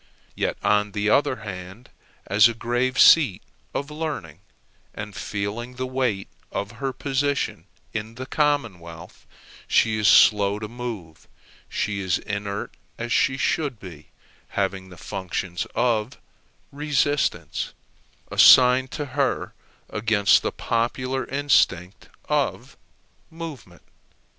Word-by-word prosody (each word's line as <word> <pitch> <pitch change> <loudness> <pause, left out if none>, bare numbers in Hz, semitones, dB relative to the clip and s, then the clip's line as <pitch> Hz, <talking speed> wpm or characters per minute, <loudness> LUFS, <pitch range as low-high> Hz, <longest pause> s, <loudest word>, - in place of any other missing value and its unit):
Yet, - - -2
on 105 0 +2
the 105 0 0
other 140 0 +3
hand, 95 +4 -9 0.3
as 105 +2 +6
a 115 - -4
grave 120 +3 -1
seat 135 - +6 0.3
of 140 +2 -4
learning, 145 - -5 0.6
and 105 -2 -7
feeling 105 +5 -4
the 130 +1 -3
weight 125 -6 -1 0.2
of 100 - -3
her 135 -1 -1
position 140 +1 -2 0.3
in 110 +1 -5
the 130 +2 -6
commonwealth, 110 - -2 0.4
she 110 -1 +2
is 105 - +2
slow 100 -1 +5
to 105 0 -5
move: 110 -9 -7 0.4
she 105 -2 -2
is 95 -3 0
inert 100 0 -5 0.2
as 120 +1 -5
she 130 +3 +2
should 140 -4 -1
be, 85 -7 -11 0.5
having 95 -1 -1
the 90 - -13
functions 90 0 -4
of 115 -1 0 0.5
resistance 140 - -1 0.6
assigned 130 +1 +7
to 150 - -3
her 140 0 -1 0.3
against 105 -2 +3
the - - -2
popular 130 +3 -2
instinct 105 -10 +1 0.2
of - - -1 0.5
movement. 155 - -9
110 Hz, 115 wpm, -24 LUFS, 100-130 Hz, 0.6 s, assigned